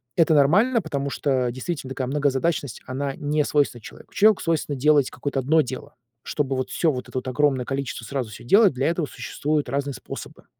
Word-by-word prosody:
Это 160 -1 +4
нормально, 205 - +4
потому 140 -5 -3
что, 130 -3 0
действительно, 130 +2 -5
такая 130 -1 -3
многозадачность, 140 0 0
она 135 +1 -3
не 150 +1 0
свойственна 145 -5 0
человеку. - - -13
Человеку 215 0 +4
свойственно 155 -3 -1
делать 145 0 +4
какое-то 140 -1 -3
одно 155 +5 +3
дело. 130 -2 -7 0.3
Чтобы 140 -3 -1
вот 130 0 -2
всё 165 - +1
вот 125 -3 -6
это - - -5
вот 130 - -3
огромное 130 -1 +1
количество 135 -3 -4
сразу 130 -2 -3
всё 105 - -11
делать, 200 - +5
для 130 +2 0
этого 165 -2 0
существуют 150 -1 -2
разные 140 +1 -2
способы, 125 - -9
140 Hz, 185 wpm, -24 LUFS, 130-155 Hz, 0.3 s, делать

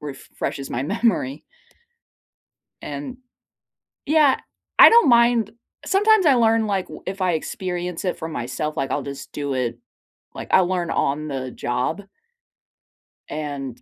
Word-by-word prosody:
refreshes 140 -1 -6
my 120 - -2
memory. 155 - 0 1.4
And 265 -3 -6 0.9
Yeah, 300 -2 +4 0.4
I - - +11
don't 470 -9 +6
mind 235 -3 +4 0.3
Sometimes 415 -2 +4
I 275 - +6
learn 225 -2 +3
like 195 -3 -1
w - - -10
if 190 +1 -5
I 180 -1 +2
experience 180 +1 -4
it 180 - -2
for 160 - -5
myself, 150 +2 -4
like 135 0 -2
I'll - - 0
just 140 -1 -8
do 145 -2 -3
it, 120 -2 -2 0.6
like - - -7
I'll 190 -1 +5
learn 180 -2 -1
on 150 +2 -1
the 130 -2 -4
job 125 +11 -2 1.3
and 140 -4 -5
175 Hz, 135 wpm, -22 LUFS, 140-230 Hz, 1.4 s, I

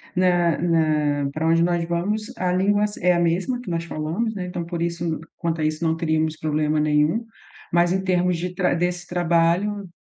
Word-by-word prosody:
Na 175 -2 +3
na 155 -4 +1
pra 155 +3 -2
onde 165 0 +4
nós 175 0 +1
vamos 205 +7 -2
a 180 -3 0
língua 200 +3 +2
s 210 0 -3
é 180 0 +5
a 175 - +1
mesma 175 +9 0
que 245 - -8
nós 165 -1 -1
falamos, 170 +9 -2
né, 185 -2 -4
então 180 -1 -4
por 170 0 -4
isso 170 -1 -2 0.2
quanto 165 -1 -2
a - - 0
isso 155 +2 -1
não 160 -1 +2
teríamos 160 -1 0
problema 155 0 0
nenhum. 150 +9 +2 0.5
Mas 175 0 +3
em 190 0 -1
termos 180 -1 +1
de 180 +2 -4
tra 180 -1 +1
desse 175 +1 -2
trabalho, 175 +4 +1
170 Hz, 200 wpm, -23 LUFS, 160-180 Hz, 0.5 s, é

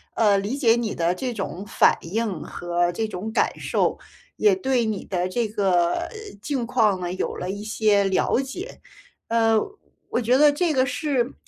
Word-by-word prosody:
呃， 205 -3 +4
理 210 +8 -2
解 230 -5 +4
你 235 -3 -2
的 170 +2 0
这 250 +3 -3
种 195 -2 -5
反 - - +3
应 200 0 -3
和 175 0 -1
这 220 +5 -2
种 210 +2 -5
感 - - 0
受， - - 0 0.4
也 420 -2 +4
对 265 -10 0
你 215 -3 -3
的 180 -1 -1
这 235 +3 -1
个， 190 -5 +2
呃， - - -3 0.3
境 260 -1 -2
况 220 -6 +2
呢 175 0 -3
有 190 - -3
了 180 - -4
一 205 +2 -5
些 215 -2 +2
了 195 +5 +1
解。 350 - -8 0.5
呃， 225 -1 +3 0.5
我 245 - 0
觉 245 +3 +3
得 295 0 +6
这 320 +1 0
个 260 -1 +3
是 270 -2 -1
220 Hz, 195 characters per minute, -24 LUFS, 190-255 Hz, 0.5 s, 得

